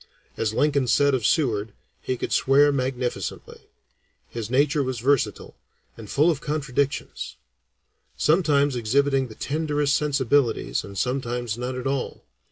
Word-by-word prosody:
As 110 -2 -1
Lincoln 140 +2 +1
said 140 +5 +3
of 125 -5 +1
Seward, 110 -9 0 0.3
he 130 - -2
could - - -3
swear 145 +2 +4
magnificently. 130 -2 -4 0.6
His 115 -2 -6
nature 140 +3 +2
was 130 -2 -2
versatile, 135 +2 0 0.4
and 110 -3 -11
full 155 +5 +3
of 150 -3 -4
contradictions; 140 -2 -2 0.8
sometimes 150 -4 +3
exhibiting 135 +3 +1
the 110 - -12
tenderest 150 -1 0
sensibilities 140 -3 +1
and 100 0 -9
sometimes 120 -1 -2
none 125 +1 -4
at 125 - -7
all. 135 -1 -3
135 Hz, 130 wpm, -24 LUFS, 120-145 Hz, 0.8 s, swear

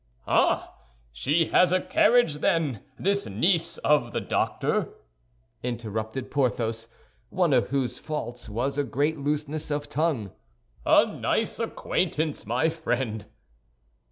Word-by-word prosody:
"Ah! - - +2 0.4
She 150 - +1
has 180 -1 +5
a 185 - +4
carriage, 215 -7 +3
then, 150 - +1 0.2
this 200 +2 0
niece 165 - +1
of 145 -6 +3
the - - 0
doctor?" - - 0 0.7
interrupted 115 0 -4
Porthos, 115 -4 0 0.4
one 175 -2 +2
of 125 -2 +3
whose 135 -2 -1
faults 125 -7 -5
was 130 +7 -1
a - - +2
great 145 +5 0
looseness 150 +2 -2
of 145 0 -2
tongue. 145 - 0 0.6
"A - - +7
nice - - -1
acquaintance, 155 -7 -1
my 125 +8 +2
friend!" 120 -9 -2
140 Hz, 120 wpm, -26 LUFS, 120-160 Hz, 0.7 s, A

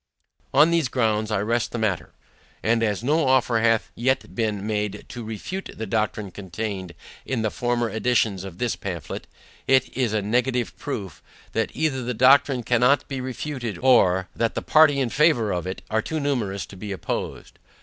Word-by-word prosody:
On 160 +3 +5
these 165 -5 +2
grounds 110 -3 0
I 105 -3 0
rest 115 +2 0
the - - -3
matter. 105 -6 -1 0.5
And 115 +1 +2
as 105 -1 0
no 150 +2 +2
offer 125 -3 +3
hath 115 -1 +2
yet 130 +3 0
been 105 -4 -1
made 105 -1 -2
to 120 - -7
refute 115 - -5
the 110 - -4
doctrine 105 -1 -1
contained 95 -1 -5 0.3
in 125 -4 -2
the 110 - 0
former 120 -1 0
editions 110 -4 +1
of 95 -3 -8
this 120 +1 -1
pamphlet, 85 -7 -6 0.4
it 130 -1 +3
is 125 -4 +1
a 105 -2 0
negative 125 +3 0
proof, 100 - -6 0.3
that - - 0
either 145 -3 0
the 125 0 -3
doctrine 135 +1 +5
cannot 125 +4 +3
be 135 -2 -4
refuted, 125 -2 -4
or, 95 -8 +4
that 115 -1 0
the - - -2
party 155 -2 +5
in 130 -3 +1
favour 140 -7 +3
of 90 0 -2
it 95 - -5
are 110 0 +2
too 160 +7 -3
numerous 110 - -1
to - - -13
be 100 +2 -7
opposed. 95 - -5
115 Hz, 180 wpm, -24 LUFS, 105-130 Hz, 0.5 s, On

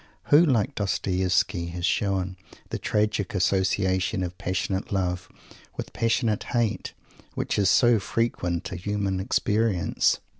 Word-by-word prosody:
Who, 150 +4 +8
like 130 -3 +2
Dostoievsky, 90 -4 0
has 90 0 -2
shown 95 -3 0 0.4
the - - -2
tragic 105 -2 0
association 95 0 +1
of 90 0 -4
passionate 95 +1 -2
love 90 -2 -1 0.5
with - - -6
passionate 115 -2 +1
hate, 115 -4 -1 0.4
which - - -1
is 100 -2 +4
so 120 +1 +5
frequent 95 -5 -2
a - - -4
human 100 0 -2
experience? 105 0 +1
95 Hz, 120 wpm, -26 LUFS, 90-110 Hz, 0.5 s, Who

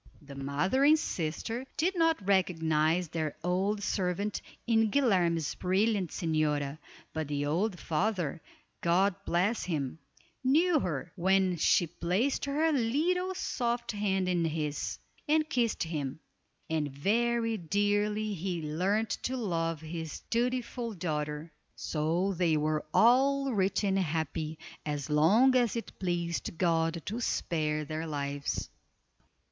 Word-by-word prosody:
The 140 -1 -10
mother 140 - 0
and 305 +2 +7
sister 225 - -3
did 365 +5 +1
not 325 - +2
recognize 165 -3 +2
their 155 -2 -3
old 195 +4 0
servant 195 +1 -1 0.2
in 225 -2 +3
Guilerme's 180 - +2
brilliant 190 0 +1
señora, 150 -3 -1 0.3
but 160 -2 -2
the 145 0 -1
old 180 +5 0
father 170 -2 -1 0.4
(God 185 +4 +3
bless 190 +7 +1
him) 150 -4 -2 0.4
knew 315 +5 +4
her, 150 - -3
when 190 0 +2
she 175 - +4
placed 180 - -1
her 305 +3 +1
little 320 +9 +1
soft 240 -6 -1
hand 195 -3 0
in 175 -2 +1
his, 155 -2 -2 0.3
and 310 0 +3
kissed 240 -6 0
him; 150 -4 -4 0.5
and 155 -3 -1
very 230 - +1
dearly 205 +3 0
he 180 -1 -3
learned 190 +9 0
to 260 +1 -2
love 165 -8 -1
his 160 -1 -6
dutiful 240 -1 -1
daughter. 150 -2 -3 0.2
So 170 +5 0
they 170 -3 +2
were 155 0 0
all 270 - +4
rich 195 0 +1
and 195 -1 +2
happy, 160 -2 -2 0.3
as 145 -1 -3
long 210 +13 +5
as 245 -3 +3
it 230 - -6
pleased 170 -2 -2
God 165 -1 +1
to 220 +4 -3
spare 155 -7 -1
their 155 +2 -4
lives. 140 -1 -3
180 Hz, 125 wpm, -30 LUFS, 155-225 Hz, 0.5 s, and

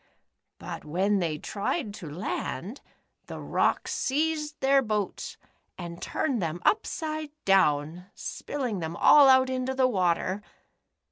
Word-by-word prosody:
But - - -7
when 190 +6 +1
they 165 -4 -1
tried 205 - -3
to 170 -6 -8
land, 185 - -4 0.5
the - - -7
rocks - - 0
seized 300 +2 -1
their 275 +1 +4
boats 215 -5 -3 0.4
and 170 -1 -7
turned 245 -6 -1
them 165 0 -2
upside 310 -7 0 0.2
down, 170 -2 +2
spilling 250 -9 -4
them 165 0 -4
all 280 +8 +7
out 260 0 +6
into 260 0 -2
the 260 -1 +4
water 185 -2 0
210 Hz, 125 wpm, -27 LUFS, 175-270 Hz, 0.5 s, all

